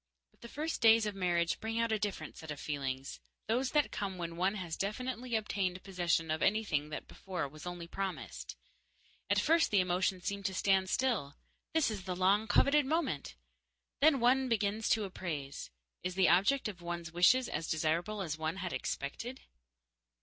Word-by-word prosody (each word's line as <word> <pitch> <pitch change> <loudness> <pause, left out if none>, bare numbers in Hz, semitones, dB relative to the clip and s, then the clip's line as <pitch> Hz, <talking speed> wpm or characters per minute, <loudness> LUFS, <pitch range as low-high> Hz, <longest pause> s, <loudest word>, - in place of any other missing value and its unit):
But - - -33
the - - -8
first 305 +5 -3
days 225 -1 +6
of 210 - -2
marriage 175 -3 +1
bring 225 +1 -3
out 230 -1 +1
a 220 - +1
different 200 -7 -4
set 160 - -10
of 150 -2 -5
feelings 135 -2 -4 0.3
those 245 +4 +1
that 295 -1 +3
come 195 -2 -3
when 170 -1 -4
one 190 +4 +1
has 175 -5 -4
definitely 245 +4 -3
obtained 195 -4 -1
possession 175 -4 0
of 155 - -1
anything 195 -9 +1
that 150 - -6
before 180 -6 -4
was 155 +5 -10
only 175 -1 -5
promised. 190 +2 -5 0.7
At - - +3
first 330 +1 +4
the 205 - +4
emotions 180 0 0
seem 200 0 -2
to 190 -1 -2
stand 190 -1 +2
still 215 - 0 0.4
this 315 -7 +3
is 195 -4 -6
the 185 -1 -2
long 195 +4 +3
coveted 280 +6 +4
moment! 275 - -1 0.6
Then 290 -1 +5
one 255 +2 +3
begins 215 -1 0
to 220 - +3
appraise. 155 -8 -5 0.3
Is 185 0 -3
the 190 -1 +4
object 205 +10 +4
of 190 -5 -7
one's 170 -1 -5
wishes 230 +9 +5
as 160 +2 -3
desirable 170 +6 0
as 160 -3 -4
one 160 +2 -1
had 185 -2 -4
expected? 235 - -4
190 Hz, 180 wpm, -33 LUFS, 170-225 Hz, 0.7 s, days